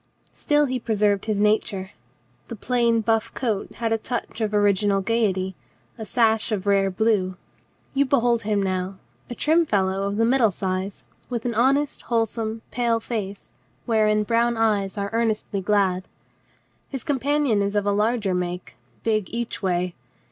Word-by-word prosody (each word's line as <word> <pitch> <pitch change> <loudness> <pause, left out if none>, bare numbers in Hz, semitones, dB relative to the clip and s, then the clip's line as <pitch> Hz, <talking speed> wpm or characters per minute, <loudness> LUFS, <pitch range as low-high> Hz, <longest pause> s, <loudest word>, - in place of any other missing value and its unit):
Still 295 0 +2
he 255 -2 -2
preserved 210 -3 +1
his 215 -2 -1
nature. 210 -2 +1 0.6
The 230 - -6
plain 235 0 +1
buff 225 +1 +1
coat 220 -6 -2
had 225 -1 -1
a 225 - 0
touch 235 0 -4
of 215 -1 0
original 205 -1 +2
gaiety, 190 -3 0 0.4
a 220 - -7
sash 225 -2 +2
of 205 -2 -2
rare 195 -1 +3
blue. 190 -2 +1 0.6
You 280 +1 +3
behold 240 -3 +2
him 205 -2 0
now, 185 0 -2 0.3
a 240 - -5
trim 320 +6 +3
fellow 195 -8 0
of 200 +1 -2
the 230 - +3
middle 240 -2 +4
size, 190 +1 -4 0.2
with 240 -2 -3
an 240 - 0
honest, 275 +6 +2
wholesome, 225 -1 -2
pale 235 0 +1
face, 205 -4 -5 0.3
wherein 215 -2 +2
brown 235 +2 +1
eyes 210 -3 +1
are 200 0 -2
earnestly 220 -3 -1
glad. 190 -2 +1 0.8
His 270 -3 -5
com 290 -4 -1
panion 280 -5 +2
is 200 +1 -1
of 205 -1 +1
larger 210 0 +1
make, 180 0 -4 0.3
big 215 -4 0
each 235 0 -4
way. 180 -2 0
215 Hz, 155 wpm, -24 LUFS, 200-235 Hz, 0.8 s, middle